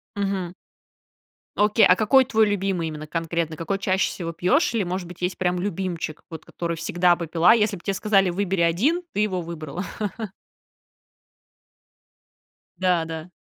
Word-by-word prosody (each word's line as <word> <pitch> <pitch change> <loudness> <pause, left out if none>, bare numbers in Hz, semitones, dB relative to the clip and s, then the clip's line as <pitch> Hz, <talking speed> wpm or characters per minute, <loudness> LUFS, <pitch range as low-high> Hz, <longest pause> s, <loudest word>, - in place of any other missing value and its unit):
Мгм. 195 -3 -2 1.0
Окей, 210 +2 +5
а 180 - +6
какой 260 +6 +4
твой 220 -4 +3
любимый 190 -5 -1
именно 155 0 -7
конкретно? 165 0 -2
Какой 190 +5 -3
чаще 190 -1 +1
всего 170 -2 -5
пьёшь? 250 - +2
Или 220 - +1
может 180 0 -4
быть 180 0 -12
есть 180 +1 -1
прям 180 -1 0
любимчик, 180 -5 -3
вот 160 -1 -8
который 170 -1 -4
всегда 175 +2 +2
бы 170 -1 -5
пила? 170 +5 +5
Если 210 -3 +1
б - - -15
те 195 - -1
сказали 195 -2 +2
выбери 190 0 -1
1, 220 - +2
ты 210 - 0
его 190 -4 0
выбрала. 165 +1 -6 2.9
Да, 180 -3 +2
да. 160 +1 -7
180 Hz, 150 wpm, -24 LUFS, 170-200 Hz, 2.9 s, а